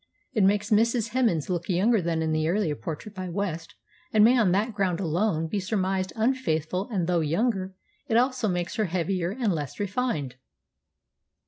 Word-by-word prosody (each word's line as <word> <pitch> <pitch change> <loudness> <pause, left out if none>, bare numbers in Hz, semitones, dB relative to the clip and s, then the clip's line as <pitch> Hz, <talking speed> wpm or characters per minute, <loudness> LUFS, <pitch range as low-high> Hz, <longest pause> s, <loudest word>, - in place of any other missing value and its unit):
It 215 -6 +2
makes 205 +2 +2
Mrs. 230 +1 +3
Hemans 220 - +1
look 175 -1 -3
younger 200 +4 +3
than 165 -1 -1
in 160 - 0
the 155 0 +1
earlier 180 -4 +1
portrait 155 - -7
by 185 -2 -5
West, 170 -3 -4 0.4
and 215 -1 +5
may 240 +4 +6
on 220 -7 +3
that 210 +5 +1
ground 190 -4 0
alone 170 -1 0
be 200 +5 -2
surmised 190 -1 -1
unfaithful, 200 - 0
and, 190 -7 -1
though 175 0 +1
younger, 190 +4 0 0.3
it 225 - +2
also 250 -2 +2
makes 180 +2 -2
her 215 - +2
heavier 175 0 -1
and 215 -1 0
less 145 -5 -5
refined." 195 - -2
190 Hz, 175 wpm, -26 LUFS, 170-220 Hz, 0.4 s, may